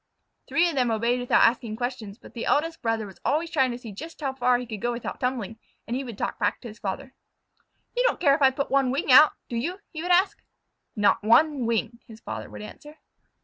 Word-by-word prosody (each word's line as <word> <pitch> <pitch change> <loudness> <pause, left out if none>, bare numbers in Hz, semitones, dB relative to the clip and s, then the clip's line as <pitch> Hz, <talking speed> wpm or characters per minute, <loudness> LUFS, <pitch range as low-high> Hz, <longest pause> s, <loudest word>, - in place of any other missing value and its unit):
Three 345 +1 +3
of 340 - -2
them 255 -4 +1
obeyed 235 +2 +1
without 245 - +3
asking 230 -2 +2
questions, 240 -4 -5
but - - -15
the 235 - -5
eldest 325 +3 +1
brother 225 -2 -1
was 195 -2 -13
always 320 +3 0
trying 265 -6 +2
to 240 - -4
see 240 -3 -9
just 320 +12 -9
how 275 -3 -2
far 250 -1 +2
he 250 - -5
could 220 -4 -7
go 240 +1 0
without 235 0 -5
tumbling, 235 -4 -3 0.3
and 235 - -3
he 265 - -2
would 235 -6 -8
talk - - -3
back - - 0
to 245 - -8
his 220 -1 -11
father. 260 +7 -5 0.8
"You - - +1
don't - - -1
care 285 -5 +4
if 285 - 0
I 270 - +7
put 275 +1 -4
one 275 -1 +3
wing 275 +2 0
out, 295 +4 +8
do 240 - -5
you?" 340 +12 -3
he 315 - -6
would 355 - -4
ask. 385 +3 +3 0.5
"Not 205 -2 +3
one 265 +3 +4
wing!" 235 +1 -1
his 225 -1 -12
father 110 - -7
would 105 0 -9
answer. 295 - -12
250 Hz, 235 wpm, -25 LUFS, 225-285 Hz, 0.8 s, out